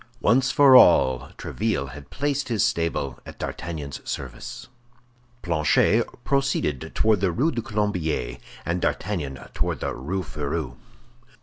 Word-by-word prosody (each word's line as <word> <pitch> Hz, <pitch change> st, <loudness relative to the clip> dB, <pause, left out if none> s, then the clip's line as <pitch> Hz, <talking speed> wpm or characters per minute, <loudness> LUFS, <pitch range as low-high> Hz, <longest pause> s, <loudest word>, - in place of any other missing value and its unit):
Once 130 Hz, +5 st, +3 dB
for 135 Hz, -1 st, +7 dB
all, 65 Hz, -, +6 dB
Tréville 105 Hz, -11 st, -2 dB
had 70 Hz, +1 st, -11 dB
placed 145 Hz, -1 st, -2 dB
his 115 Hz, -3 st, +1 dB
stable 85 Hz, -5 st, -1 dB
at -, -, -11 dB
D'Artagnan's 75 Hz, -5 st, -5 dB
service. -, -, -6 dB, 0.8 s
Planchet 85 Hz, +7 st, +3 dB, 0.2 s
proceeded 140 Hz, -, 0 dB
toward 110 Hz, -4 st, +3 dB
the 95 Hz, -3 st, +2 dB
Rue 140 Hz, -, +1 dB
du 120 Hz, -, -2 dB
Colombier, 90 Hz, -, -2 dB, 0.3 s
and 85 Hz, +1 st, -1 dB
D'Artagnan 80 Hz, -10 st, -2 dB, 0.2 s
toward -, -, -1 dB
the -, -, -2 dB
Rue 90 Hz, +9 st, -3 dB
Férou. 75 Hz, -2 st, -4 dB
85 Hz, 125 wpm, -24 LUFS, 70-115 Hz, 0.8 s, for